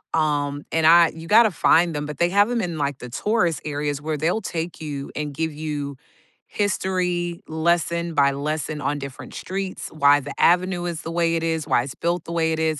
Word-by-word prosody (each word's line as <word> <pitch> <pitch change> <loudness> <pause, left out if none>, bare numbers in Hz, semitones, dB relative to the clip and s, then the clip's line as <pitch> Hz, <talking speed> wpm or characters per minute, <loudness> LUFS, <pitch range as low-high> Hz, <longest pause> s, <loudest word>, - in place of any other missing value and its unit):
um 145 -2 0
and 160 -1 +3
I 170 0 +7
you 165 0 -10
gotta 220 +2 +6
find 170 0 +3
them, 145 0 -2
but 150 -2 -7
they 170 +3 +2
have 205 +4 +3
'em 240 -1 0
in, 175 -4 -3
like, 140 -2 -1
the 125 - -8
tourist 175 - 0
areas, 145 -1 -3
where 155 0 -2
they'll 170 +9 0
take 170 -3 -5
you, 145 -3 -5
and 150 -1 -3
give 160 +2 -2
you 145 -2 -4 0.5
history, 180 -4 -1
lesson 170 +1 0
by 140 -2 +4
lesson, 150 +2 -3
on 145 0 -1
different 140 -1 -8
streets, 190 0 -5
why 145 -1 +4
the 140 +1 -7
avenue 180 0 +3
is 170 -2 -4
the 165 - -6
way 165 0 +1
it 165 - -1
is, 160 -2 -1
why 125 -4 +3
it's 135 +1 -7
built 170 0 -1
the - - -7
way 165 -1 +1
it - - -2
is. 160 -1 0
160 Hz, 210 wpm, -23 LUFS, 145-175 Hz, 0.5 s, I